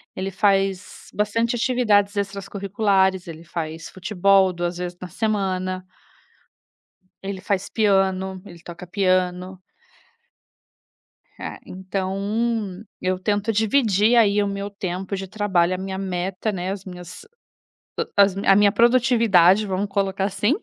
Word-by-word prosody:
Ele 190 +1 -3
faz 195 -1 0
bastante 230 +3 0
atividades 215 -5 +2
extras 200 -1 -3
curriculares, 195 -2 +1
ele 165 0 -9
faz 165 -1 -6
futebol 190 0 +2
2 175 0 -3
vezes 180 0 -5
na 180 - -6
semana 185 -3 -2 1.4
ele 195 -1 -5
faz 195 0 -2
piano, 190 -3 +1
ele 175 -3 -12
toca 175 +1 -10
piano. 185 0 0 1.8
É, - - -6
então 195 +2 -3 0.2
eu 185 0 -1
tento 205 +3 0
dividir 220 0 +3
aí 210 -3 +4
o 200 - 0
meu 200 +1 -4
tempo 195 -1 -4
de 195 0 -5
trabalho, 185 -3 +1
a - - -5
minha 190 0 -5
meta, 190 +2 -3
né, 185 -1 -3
as 195 -1 -6
minhas 180 - -10 0.9
a 200 - +9
as 195 -1 +1
a 195 0 +4
minha 205 0 +5
produtividade 230 -5 +4
vamos 195 +1 -1
colocar, 195 -1 -1
assim, 200 +5 +1
195 Hz, 130 wpm, -22 LUFS, 185-205 Hz, 1.8 s, a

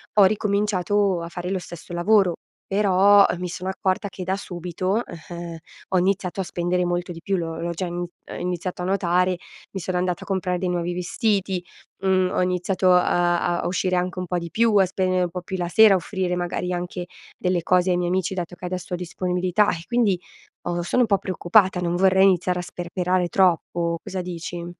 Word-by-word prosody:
ho 205 - +7
ricominciato 200 -2 +1
a 170 - -6
fare 175 +1 -5
lo 190 - 0
stesso 175 0 -10
lavoro. 190 +1 +3 0.3
Però, 200 0 +5
uhm, 175 - -2
mi 180 -1 -3
sono 185 +2 -4
accorta 190 +2 -1
che 185 - -7
da 190 +1 -1
subito, 185 +3 -2
ehm, 170 0 -8 0.3
ho 190 - +2
iniziato 190 0 0
a - - -1
spendere 180 +1 -1
molto 175 +1 -2
di 165 -1 -9
più, 195 0 0
l'ho 165 -1 -4
l'ho 170 +1 -2
già 180 +2 -3
in 175 - -5
uhm, 175 0 -7
iniziato 180 0 -3
a - - -2
notare, 180 -1 +1 0.3
mi 195 - -4
sono 180 +1 -2
andata 180 -1 -1
a - - -14
comprare 185 -2 -1
dei 180 0 -2
nuovi 175 0 -1
vestiti, 190 0 -1 0.4
mhmm, 185 -1 +2
ho - - 0
iniziato, 180 +1 0
uhm, 180 - +7
a 175 0 +2
uscire 185 0 0
anche 180 +1 -1
un 180 - -3
po' 180 - -1
di 170 0 -6
più, 230 +2 +2
a 190 - +6
spendere 185 0 0
un 175 - -1
po' 180 +1 -5
più 190 +1 -4
la 175 -1 -2
sera, 220 +1 +7
a - - +4
offrire 185 0 -2
magari 180 0 -2
anche 175 0 -4 0.3
delle 180 -1 0
cose 180 +1 +3
ai 175 - +2
miei 175 0 0
amici, 185 +1 0
dato 180 -1 -4
che 180 +1 -9
adesso 180 0 -5
ho - - 0
disponibilità 180 +3 0
e 165 - -5
quindi 230 -7 +2 0.4
ho 175 0 -2
sono 250 +8 +1
un 230 - 0
po' 200 - +3
preoccupata, 185 0 +2
non 175 0 0
vorrei 190 +1 +4
iniziare 180 -1 +3
a - - -1
sperperare 180 +1 -1
troppo. 170 -2 +1
Cosa 185 -1 -4
dici? 175 -1 -6
180 Hz, 210 wpm, -23 LUFS, 175-190 Hz, 0.4 s, ho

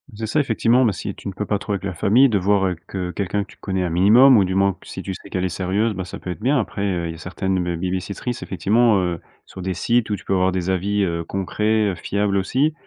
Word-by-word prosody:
C'est 110 +1 -4
ça, 110 +8 0
effectivement. 125 -1 +3
Mais, 110 - +2
si 85 - -5
tu - - -9
ne 100 - -4
peux 105 +2 -4
pas 105 -1 -1
trop 100 - -3
avec 100 - -3
la 100 -2 -3
famille, 115 +10 +4
de 105 - +2
voir, 95 +1 +2
heu, 90 -1 0
que 90 -2 -4
quelqu'un 100 +1 -2
que 100 - -17
tu - - -18
connais 95 -1 -2
un 90 - -1
minimum 110 +9 +6
ou 100 - +4
du 95 +1 -2
moins 100 0 +3
q - - -19
si 95 - -7
tu 95 - -4
sais, - - -11
qu'elle 90 - -2
est 95 - 0
sérieuse, 95 +6 0
ben, 95 -2 -5
ça - - -8
peut - - -8
être - - -7
bien. 130 +6 +2
Après, 100 -2 -4
heu, 90 -3 -1
il 80 - -4
y - - -7
a - - -11
certaines 95 +2 -2
be - - -3
babysittrice, 95 +7 -3
effectivement, 110 +2 +2
heu, 90 -2 -2 0.3
sur 95 - -10
des 95 0 -2
sites 115 +5 +1
où 105 - 0
tu - - -11
peux - - -1
avoir 95 0 +2
des 95 0 -2
avis, 100 +2 0
heu, 85 -2 -1
concrets, 105 +4 0
heu, - - -5
fiables, 100 +2 -1
aussi. 135 +11 +1
95 Hz, 290 wpm, -21 LUFS, 95-110 Hz, 0.3 s, minimum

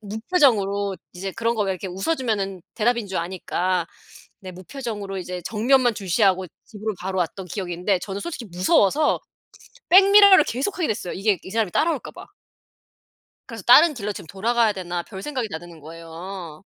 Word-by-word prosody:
무표정으로 205 - +1 0.2
이제 190 +2 -5
그런 230 +2 -1
거 215 - +1
왜 195 - 0
이렇게 185 +1 -6
웃어 195 - -1
주면은 200 - -2
대답인 235 0 0
줄 190 - -4
아니까 180 0 -2 0.5
네 185 - -8
무표정으로 200 0 -6
이제 180 0 -5
정면만 240 +2 +2
주시하고 190 -1 +1 0.2
집으로 215 0 -5
바로 190 +1 -3
왔던 180 +2 -3
기억인데 180 0 -2
저는 195 +1 -5
솔직히 310 -6 -6
무서워서 195 - +2 0.7
백미러를 390 -2 +8
계속 275 - -3
하게 335 - 0
됐어요 205 -4 -3
이게 195 0 +1
이 - - -10
사람이 220 -2 0
따라올까 315 -4 0
봐. - - -11 1.2
그래서 230 -5 -8
'다른 300 +6 +7
길로 210 -4 -4
지금 185 - -10
돌아가야 225 +5 +1
되나.' 175 -2 -4
별생각이 225 +6 -5
다 160 - -5
드는 170 -1 -13
거예요. 165 +2 -9
200 Hz, 385 characters per minute, -23 LUFS, 185-235 Hz, 1.2 s, 백미러를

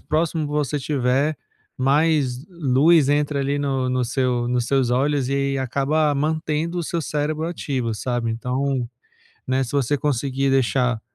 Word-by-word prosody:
próximo 160 0 -1
você 150 -1 -1
estiver, 140 +1 0 0.4
mais 140 -1 +1
luz 155 -2 +3
entra 145 0 +1
ali 140 +1 0
no 135 -2 -1
no 125 0 0
seu 125 -1 0
nos 120 -1 0
seus 135 -2 +1
olhos, 135 +1 +1
e 140 - 0
aí 140 0 0
acaba 140 +4 +1
mantendo 155 +3 -1
o - - -1
seu 170 +1 -2
cérebro 150 +1 -2
ativo, 130 -9 -2
sabe, 120 +1 -2
então, 125 +2 -2 0.6
né, 130 +1 +1
se 120 - -8
você 140 0 +1
conseguir 135 -1 0
deixar 125 -2 +1
140 Hz, 150 wpm, -22 LUFS, 130-150 Hz, 0.6 s, luz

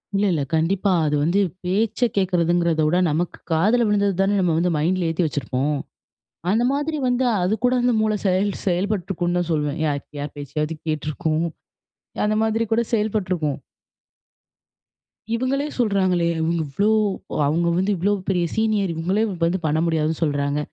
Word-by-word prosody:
இல்ல 200 +1 +2
இல்ல 155 -5 0
கண்டிப்பா. 185 +5 +1
அது 150 0 +1
வந்து 170 +6 +2 0.2
பேச்ச 210 +5 0 0.2
கேட்கிறதுங்கிறத 175 -3 +2
விட, 170 +3 +2
நமக்கு 165 +4 -2
காதில 215 +9 +3
விழுந்தது 200 -1 +2
தானே 195 +1 +2
நம்ம 180 -3 +2
வந்து 175 +2 +1
மைண்டில 175 +3 +1
ஏத்தி 165 +2 0
வச்சுருப்போம். 145 +1 -1 0.7
அந்த 220 +4 +2
மாதிரி 295 +3 -1
வந்தா 250 0 +2 0.2
அதுக்கூட, 220 +6 +1
அந்த 245 0 +3
மூள 215 0 +2
செயல் 190 +2 +2
செயல்ப்பட்ருக்கும் 180 -1 -1
தான் 175 -1 -1
சொல்வேன். 150 0 -1
யா 150 - +1 0.3
யார் 145 0 -6
பேச்சையாவது 150 +3 -3
கேட்டிருக்கும். 155 +1 -1 0.8
அந்த 215 0 +1
மாதிரி 220 +1 +1
கூட 230 - +3
செயல்ப்பட்ருக்கும். 185 -9 0 1.8
"இவங்களே 265 +4 0
சொல்றாங்களே!" 190 -6 +2
இவங்க 165 +1 0
இவ்ளோ 200 +10 +1 0.4
ஒ - - -3
அவங்க 165 +4 +1
வந்து 190 +3 +1
இவ்ளோ 190 +4 +1 0.2
பெரிய 180 -2 +1
சீனியர், 215 -4 +1
இவங்களே 185 +7 0 0.2
வந்து 170 +3 +1
பண்ண 155 0 +1
முடியாதுன்னு 160 -1 0
சொல்றாங்க. 145 -1 0
180 Hz, 145 wpm, -22 LUFS, 160-205 Hz, 1.8 s, காதில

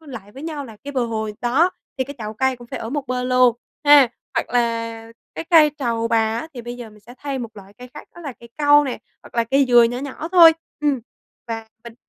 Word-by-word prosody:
vô 315 - -19
lại 220 -7 -10
với 270 +5 -10
nhau 310 -3 -5
là 225 -4 -12
cái 285 - -6
bờ 255 -3 0
hồ 220 -1 -3
đó, 270 +9 +2 0.3
thì 260 - +1
cái 285 - -9
chậu 215 0 -6
cây 265 +2 0
cũng 240 0 -13
phải - - -6
ở 225 - -6
một 285 -2 -3
bên 250 0 -2
luôn 250 -2 +4 0.3
ha, 290 -4 +7 0.3
hoặc - - -1
là 230 -1 -2 0.2
cái - - -5
cây 315 -3 +7
trầu 230 -3 -1
bà 230 - +2 0.2
á 315 - -6
thì 240 - -7
bây 240 +1 -7
giờ 235 -3 -9
mình 210 - -18
sẽ 235 +4 -14
thay 280 -2 -4
một 230 -3 -7
loại 200 0 -13
cây 250 - -11
khác 295 - -11
đó - - -12
là 290 -5 -6
cây 235 - -13
cau 290 0 +5
nè, 255 -5 -4 0.2
hoặc - - -16
là 235 - +2
cây 275 +4 +3
dừa 240 -1 +7
nhỏ 240 +2 0
nhỏ 285 +4 -6
thôi. 335 -3 +9 0.3
Ừm, 285 -4 +1 0.5
và 225 -1 -5 0.2
mình 235 - -10
245 Hz, 260 wpm, -21 LUFS, 230-285 Hz, 0.5 s, thôi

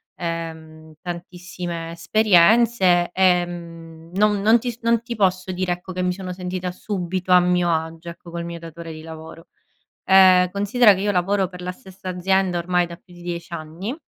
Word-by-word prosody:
ehm, 160 -2 -6
tantissime 175 -1 -6
esperienze. 185 +1 +4
Ehm, 170 -3 -1
non 205 +1 +2
non 220 +3 +5
ti 240 -1 -5
non 230 0 +2
ti 235 0 -6
posso 185 -2 0
dire 180 0 -2
ecco 180 +1 -5
che 185 - -3
mi 180 0 0
sono 185 -1 -6
sentita 180 0 -4
subito 185 -1 -4
a 180 - +8
mio 180 -1 +2
agio 160 +1 -3
ecco 170 0 -11
col 170 0 -5
mio 170 0 -6
datore 165 0 -9
di 155 - -10
lavoro. 160 +1 -11 0.6
Ehm 185 -1 +6
considera 205 +3 +4
che 190 - -4
io 205 - +1
lavoro 195 +1 +1
per 180 -1 -10
la 180 0 -4
stessa 190 0 -10
azienda 185 0 +1
ormai 180 +1 +1
da 170 0 -9
più 180 +1 -24
di 175 - -14
10 170 -1 -5
anni 170 - -6
180 Hz, 175 wpm, -22 LUFS, 170-190 Hz, 0.6 s, a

